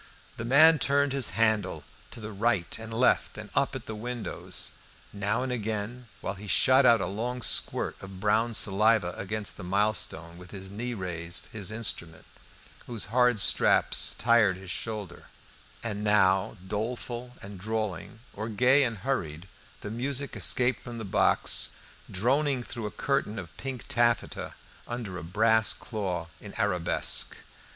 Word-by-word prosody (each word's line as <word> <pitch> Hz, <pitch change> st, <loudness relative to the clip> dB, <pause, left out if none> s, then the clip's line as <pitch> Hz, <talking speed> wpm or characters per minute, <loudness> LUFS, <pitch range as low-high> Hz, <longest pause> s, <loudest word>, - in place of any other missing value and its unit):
The 115 Hz, -, -4 dB
man 155 Hz, +6 st, +7 dB
turned 140 Hz, 0 st, +2 dB
his 135 Hz, -3 st, +2 dB
handle, 110 Hz, -4 st, +2 dB
looking -, -, -25 dB, 0.2 s
to -, -, -10 dB
the 105 Hz, 0 st, -6 dB
right 105 Hz, -3 st, 0 dB
and 115 Hz, 0 st, -8 dB
left, 120 Hz, +3 st, +2 dB
and -, -, -9 dB
up -, -, +1 dB
at -, -, -6 dB
the 110 Hz, -, -5 dB
windows. 120 Hz, +2 st, -4 dB, 0.4 s
Now 105 Hz, +4 st, -1 dB
and 130 Hz, -, -3 dB
again, 110 Hz, +1 st, -4 dB
while -, -, -3 dB
he 100 Hz, +1 st, -10 dB
shot 130 Hz, -, +5 dB
out 115 Hz, -1 st, +6 dB
a -, -, 0 dB
long 120 Hz, +4 st, -3 dB
squirt -, -, -1 dB
of 95 Hz, -1 st, -9 dB
brown 110 Hz, +3 st, +2 dB
saliva 105 Hz, -2 st, +3 dB
against 105 Hz, +1 st, -3 dB
the -, -, -8 dB
milestone, 90 Hz, -3 st, -1 dB
with 90 Hz, -, -12 dB
his 95 Hz, -1 st, -9 dB
knee 120 Hz, +4 st, -4 dB
raised 85 Hz, -3 st, -3 dB
his 105 Hz, -4 st, -4 dB
instrument, 105 Hz, -7 st, -3 dB, 0.6 s
whose 115 Hz, -4 st, -2 dB
hard 125 Hz, -3 st, +4 dB
straps -, -, +3 dB
tired 115 Hz, -5 st, +4 dB
his 95 Hz, -2 st, -6 dB
shoulder; 105 Hz, -3 st, -4 dB, 0.6 s
and 105 Hz, -3 st, -3 dB
now, 95 Hz, -3 st, +3 dB
doleful 120 Hz, +4 st, -4 dB
and 100 Hz, -1 st, -9 dB
drawling, 110 Hz, 0 st, -4 dB
or 110 Hz, +3 st, -5 dB
gay 125 Hz, +6 st, +4 dB
and 115 Hz, -3 st, -3 dB
hurried, 85 Hz, -, -2 dB, 0.3 s
the 105 Hz, -, -6 dB
music 135 Hz, +4 st, -2 dB
escaped 125 Hz, 0 st, +2 dB
from 120 Hz, -1 st, -8 dB
the 110 Hz, -, -5 dB
box, 95 Hz, -, +2 dB, 0.3 s
droning 130 Hz, +6 st, +1 dB
through 115 Hz, -3 st, -5 dB
a -, -, -10 dB
curtain 135 Hz, -6 st, 0 dB
of 85 Hz, -6 st, -8 dB
pink 130 Hz, -3 st, -6 dB
taffeta 120 Hz, -2 st, 0 dB, 0.3 s
under 115 Hz, -7 st, -5 dB
a -, -, -8 dB
brass 110 Hz, +5 st, +3 dB
claw 95 Hz, -7 st, -4 dB
in 105 Hz, -, -11 dB
arabesque. 90 Hz, -5 st, +2 dB
110 Hz, 155 wpm, -28 LUFS, 95-120 Hz, 0.6 s, man